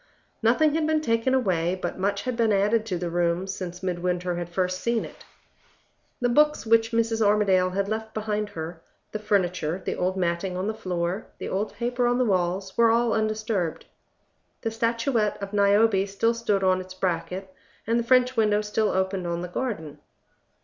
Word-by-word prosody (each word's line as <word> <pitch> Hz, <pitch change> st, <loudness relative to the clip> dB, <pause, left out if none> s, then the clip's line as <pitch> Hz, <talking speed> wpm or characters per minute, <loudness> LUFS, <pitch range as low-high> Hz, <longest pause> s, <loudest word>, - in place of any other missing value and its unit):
Nothing 250 Hz, +7 st, +3 dB
had 315 Hz, 0 st, +1 dB
been 315 Hz, 0 st, +2 dB
taken 230 Hz, -1 st, +1 dB
away, 185 Hz, -7 st, +1 dB
but -, -, -4 dB
much 200 Hz, +1 st, 0 dB
had 255 Hz, -1 st, -2 dB
been 230 Hz, -2 st, +2 dB
added 210 Hz, +3 st, +2 dB
to 185 Hz, -5 st, -1 dB
the 170 Hz, 0 st, -3 dB
room, 175 Hz, +1 st, +1 dB
since 185 Hz, -1 st, -6 dB
Midwinter 180 Hz, 0 st, -1 dB
had 175 Hz, 0 st, -4 dB
first 185 Hz, +1 st, -1 dB
seen 235 Hz, -1 st, 0 dB
it. -, -, -13 dB, 1.0 s
The 245 Hz, -, +1 dB
books 300 Hz, +2 st, +3 dB
which 225 Hz, 0 st, +4 dB
Mrs. 230 Hz, -1 st, +1 dB
Armadale 200 Hz, -3 st, +3 dB
had 195 Hz, +2 st, -1 dB
left 220 Hz, +1 st, -3 dB
behind 210 Hz, -1 st, -2 dB
her, 160 Hz, 0 st, -7 dB, 0.3 s
the 215 Hz, -, -4 dB
furniture, 185 Hz, -5 st, 0 dB
the -, -, -1 dB
old 185 Hz, +1 st, -1 dB
matting 180 Hz, +1 st, -1 dB
on 185 Hz, -, -2 dB
the 220 Hz, -, -1 dB
floor, 185 Hz, -2 st, -3 dB
the -, -, -5 dB
old 205 Hz, +3 st, -2 dB
paper 245 Hz, +2 st, 0 dB
on 245 Hz, 0 st, +2 dB
the 255 Hz, -, +2 dB
walls, 190 Hz, -1 st, 0 dB
were 230 Hz, -1 st, +5 dB
all 235 Hz, 0 st, +3 dB
undisturbed. 215 Hz, -5 st, -1 dB, 0.8 s
The 225 Hz, -, -2 dB
statuette 230 Hz, -1 st, 0 dB
of 200 Hz, 0 st, -6 dB
Niobe 200 Hz, 0 st, +4 dB
still 215 Hz, +4 st, +1 dB
stood 210 Hz, -4 st, 0 dB
on 185 Hz, 0 st, +3 dB
its 185 Hz, 0 st, -10 dB
bracket, 185 Hz, +1 st, -3 dB, 0.3 s
and 230 Hz, +2 st, +1 dB
the -, -, 0 dB
French 255 Hz, +1 st, +3 dB
window 210 Hz, -2 st, +3 dB
still 210 Hz, 0 st, 0 dB
opened 190 Hz, -1 st, -1 dB
on 170 Hz, 0 st, -2 dB
the -, -, -4 dB
garden. 180 Hz, -, -4 dB
205 Hz, 185 wpm, -25 LUFS, 185-230 Hz, 1.0 s, were